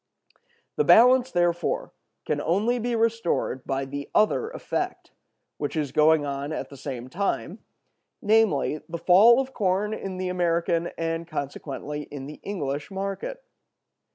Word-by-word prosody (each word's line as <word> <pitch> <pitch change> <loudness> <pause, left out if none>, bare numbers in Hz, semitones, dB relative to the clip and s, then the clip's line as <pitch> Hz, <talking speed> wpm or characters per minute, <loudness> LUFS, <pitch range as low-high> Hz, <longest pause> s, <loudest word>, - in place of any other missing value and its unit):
The 445 - +3
balance, 250 - +6
therefore, 175 -3 0 0.3
can - - -1
only 215 +9 +1
be 240 +1 -1
restored 225 - 0
by 135 0 -1
the 140 +1 -6
other 215 - +3
effect, - - -4 0.5
which - - -3
is 150 -4 -1
going 155 +1 +4
on 140 +1 -4
at 155 - -4
the 140 - -11
same 130 -3 -6
time, 195 +9 -2 0.6
namely, 205 -9 +2
the 170 - -4
fall 200 +9 +6
of 265 0 -3
corn 200 +1 0
in 195 -3 -5
the 185 0 -2
American 170 -1 0
and 165 0 -2
consequently 150 -1 -5
in 140 -2 -7
the 150 +2 -9
English 145 -7 -4
market. 195 - -5
175 Hz, 140 wpm, -25 LUFS, 145-215 Hz, 0.6 s, balance